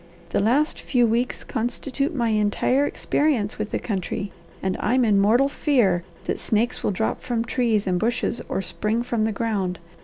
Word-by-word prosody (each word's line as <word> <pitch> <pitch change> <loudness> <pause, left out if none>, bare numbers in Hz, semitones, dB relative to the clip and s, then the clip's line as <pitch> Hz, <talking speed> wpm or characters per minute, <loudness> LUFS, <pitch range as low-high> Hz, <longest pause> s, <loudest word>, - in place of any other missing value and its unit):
The - - +1
last 260 +10 +2
few 245 -3 +2
weeks 235 +2 0
constitute 265 +5 -2
my 235 -3 +1
entire 215 +6 +2
experience 255 -9 0
with 210 - -2
the - - -1
country, 195 -1 -3 0.3
and 190 -1 0
I'm 250 +3 +2
in 205 -3 +4
mortal 235 +7 +4
fear 235 - +2 0.2
that - - -2
snakes 230 +3 0
will - - +1
drop 205 +3 -1
from 235 -2 -1
trees 230 -5 +1
and 180 -2 +1
bushes 235 +2 -1
or 195 - -1
spring 220 +5 -1
from 235 -3 0
the 220 - 0
ground. 200 -5 -1
225 Hz, 175 wpm, -24 LUFS, 205-245 Hz, 0.3 s, in